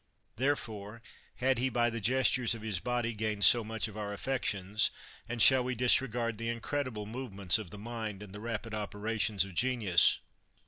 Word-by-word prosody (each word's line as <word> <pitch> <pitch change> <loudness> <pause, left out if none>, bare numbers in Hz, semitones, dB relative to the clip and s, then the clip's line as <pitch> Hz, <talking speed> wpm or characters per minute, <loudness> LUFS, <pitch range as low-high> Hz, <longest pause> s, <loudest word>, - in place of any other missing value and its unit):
Therefore 115 -5 -3 0.3
had 130 0 +1
he 130 +2 +1
by 120 -1 +1
the 115 0 -4
gestures 125 +1 +2
of 110 - -10
his 105 -5 -2
body 120 0 -2
gained 105 -2 +1
so 120 -2 +7
much 110 0 -3
of 105 - -11
our 105 -1 -4
affections, 105 -4 0 0.4
and 120 -1 +2
shall 130 -1 +7
we 130 0 -2
disregard 120 -2 +1
the 115 0 -3
incredible 115 -2 -3
movements 105 -6 -1
of 105 -5 -8
the 105 - -10
mind, 110 -2 -6
and 100 -2 -12
the 105 - -8
rapid 115 0 -5
operations 105 -1 -1
of 95 - -11
genius 110 -6 +3
115 Hz, 175 wpm, -31 LUFS, 105-120 Hz, 0.4 s, so